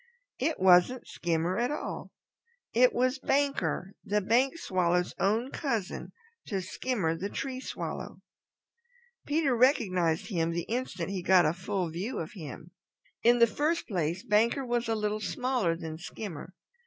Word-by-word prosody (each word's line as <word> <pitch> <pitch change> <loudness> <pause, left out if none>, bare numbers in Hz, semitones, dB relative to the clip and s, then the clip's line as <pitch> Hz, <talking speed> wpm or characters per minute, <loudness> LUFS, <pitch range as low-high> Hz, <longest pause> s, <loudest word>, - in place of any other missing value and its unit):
It 325 - 0
wasn't 185 +7 +5
Skimmer 170 +2 -1
at 240 - +1
all. 295 - -4 0.6
It 250 +2 +6
was 255 +2 +1
Banker 275 -8 0
the 210 +1 +1
Bank 245 - +2
Swallow, 180 - +1 0.2
own 225 +7 +1
cousin 230 - -3 0.4
to 195 - -1
Skimmer 185 -3 -1
the 195 +5 -4
Tree 260 +2 -4
Swallow. - - -6 1.0
Peter 295 -4 +2
recognized 185 - +2
him 165 -5 0
the 170 0 -1
instant 195 -7 -3
he 190 -2 -2
got 180 0 +5
a 155 - +2
full 185 -1 -2
view 195 +10 -4
of 160 - -4
him. 160 - -9 0.5
In 240 +1 +5
the 235 - +7
first 300 +9 -1
place 175 -2 -1
Banker 230 +4 +2
was 240 -1 0
a 225 - +2
little 210 0 -1
smaller 250 -9 0
than 160 -1 -6
Skimmer. 180 -1 -7
205 Hz, 145 wpm, -29 LUFS, 175-250 Hz, 1.0 s, the